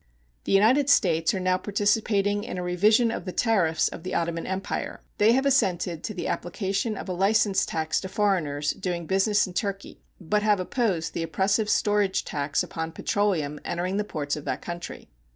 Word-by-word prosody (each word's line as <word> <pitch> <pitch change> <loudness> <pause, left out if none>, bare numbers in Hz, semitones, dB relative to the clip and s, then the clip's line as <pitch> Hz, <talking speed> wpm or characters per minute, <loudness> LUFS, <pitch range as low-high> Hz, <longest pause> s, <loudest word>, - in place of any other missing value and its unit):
The - - -2
United 245 +8 +4
States 165 - +3
are - - -2
now 185 0 +1
participating 205 0 +1
in - - -6
a 180 - -3
revision 215 +6 +3
of - - -5
the 185 - -4
tariffs 180 -8 +2
of - - -7
the 185 - -4
Ottoman 170 0 -2
Empire. 190 +1 -4 0.2
They 215 +2 +5
have 265 +2 +1
assented 180 - +1
to 215 - -5
the 180 - -3
application 195 +4 -2
of - - -7
a 185 - -2
license 195 +1 +2
tax 160 -1 -1
to 190 - -6
foreigners 165 -8 0
doing 175 -2 -4
business 200 +4 +2
in 185 - -9
Turkey, 195 +1 -4 0.2
but 210 +4 0
have 210 -2 +2
opposed 185 -5 -1
the - - -3
oppressive 190 +7 0
storage 205 -2 +1
tax 145 0 -1
upon 160 0 -5
petroleum 165 -8 -1
entering 180 +3 -2
the 210 - +1
ports 145 -8 -3
of 150 - -7
that - - -3
country. 175 0 -7
190 Hz, 185 wpm, -26 LUFS, 170-210 Hz, 0.2 s, They